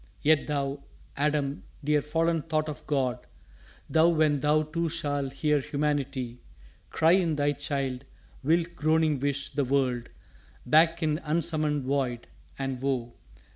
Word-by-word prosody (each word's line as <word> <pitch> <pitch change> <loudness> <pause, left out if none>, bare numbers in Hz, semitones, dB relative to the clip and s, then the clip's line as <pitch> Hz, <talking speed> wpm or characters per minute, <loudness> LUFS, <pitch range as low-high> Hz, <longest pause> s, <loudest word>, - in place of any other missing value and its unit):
Yet 155 0 +4
thou, 140 -1 -2 0.3
Adam, 145 -1 0 0.2
dear 150 0 +2
fallen 165 +2 0
thought 155 0 -1
of 150 - -7
God, 130 -4 -1 0.6
Thou, 160 +1 +4
when 155 -3 +2
thou 150 +2 +3
too 165 +2 -2
shall 145 -4 -2
hear 150 +2 +1
humanity 140 -4 -2 0.5
Cry 160 +1 +3
in 175 -4 +3
thy 145 0 +2
child, 140 -2 -3 0.4
wilt 165 +4 +1
groaning 155 -1 +2
wish 140 +1 -2
the 145 0 +1
world 130 -2 0 0.6
Back 165 +5 +4
in 155 0 +1
unsummoned 155 -2 0
Void! 130 -3 -1 0.3
and, 135 -2 -3
woe! 125 -3 -1
145 Hz, 135 wpm, -28 LUFS, 135-155 Hz, 0.6 s, Yet